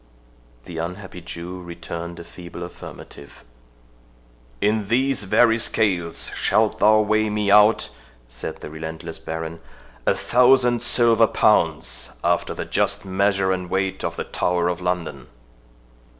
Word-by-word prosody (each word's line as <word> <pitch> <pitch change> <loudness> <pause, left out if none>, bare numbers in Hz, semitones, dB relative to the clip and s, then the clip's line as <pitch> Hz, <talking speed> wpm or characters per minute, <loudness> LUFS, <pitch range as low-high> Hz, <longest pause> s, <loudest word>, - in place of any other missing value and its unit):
The 85 -2 -7
unhappy 90 +2 -6
Jew 85 +2 -8
returned 85 0 -7
a - - -8
feeble 85 0 -10
affirmative. 70 -4 -11 1.2
"In 105 -1 0
these 125 0 +1
very 115 +3 +4
scales 90 -8 0
shalt 110 -1 +1
thou 110 +1 +5
weigh 110 0 +1
me 105 -1 0
out," 105 +2 +5 0.4
said - - -7
the - - -8
relentless 80 +1 -7
Baron, 80 0 -6 0.5
"a - - +4
thousand 125 -1 +3
silver 115 -2 +4
pounds, 80 -9 +1
after 85 0 0
the - - -4
just - - 0
measure 95 0 +1
and 90 -1 -3
weight 95 0 -2
of - - -3
the - - -3
Tower 90 -1 0
of 90 0 -3
London." 85 -8 -3
95 Hz, 130 wpm, -22 LUFS, 85-110 Hz, 1.2 s, thou